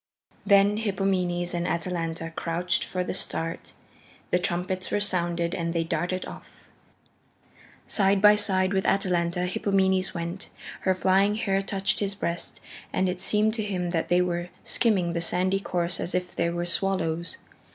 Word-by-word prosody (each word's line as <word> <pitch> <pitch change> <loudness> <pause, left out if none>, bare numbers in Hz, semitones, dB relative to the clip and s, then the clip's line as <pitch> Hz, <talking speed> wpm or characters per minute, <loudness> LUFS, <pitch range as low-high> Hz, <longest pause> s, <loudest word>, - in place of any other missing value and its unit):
Then 200 0 +5
Hippomenes 190 -4 0
and 175 0 -1
Atalanta 165 -1 -3
crouched 175 +1 -1
for 180 -1 -3
the - - -3
start. 165 -3 -3 0.6
The 180 - +3
trumpets 180 +1 -1
were - - +1
sounded 175 -4 0
and 170 -1 -2
they 165 - +2
darted 180 +2 -2
off. - - -12 1.2
Side 195 -1 +2
by 210 +1 +7
side 190 -2 +2
with 190 -1 +1
Atalanta, 180 -3 +1
Hippomenes 190 0 +1
went. 170 +3 -5 0.3
Her 190 -1 +1
flying 195 +3 +3
hair 195 -3 0
touched 195 0 0
his 200 -1 -1
breast, 170 -3 -3 0.3
and 190 - +1
it 180 0 -3
seemed 210 +2 +3
to 220 -1 -2
him 180 -4 -2
that 165 -2 -1
they 180 0 +4
were 175 0 -2
skimming 190 -8 +1
the 170 - -1
sandy 185 +3 +2
course 175 -3 -1
as 175 - -2
if 180 -1 -2
they 170 - +1
were 175 0 -2
swallows. 170 -2 0
180 Hz, 155 wpm, -26 LUFS, 175-195 Hz, 1.2 s, by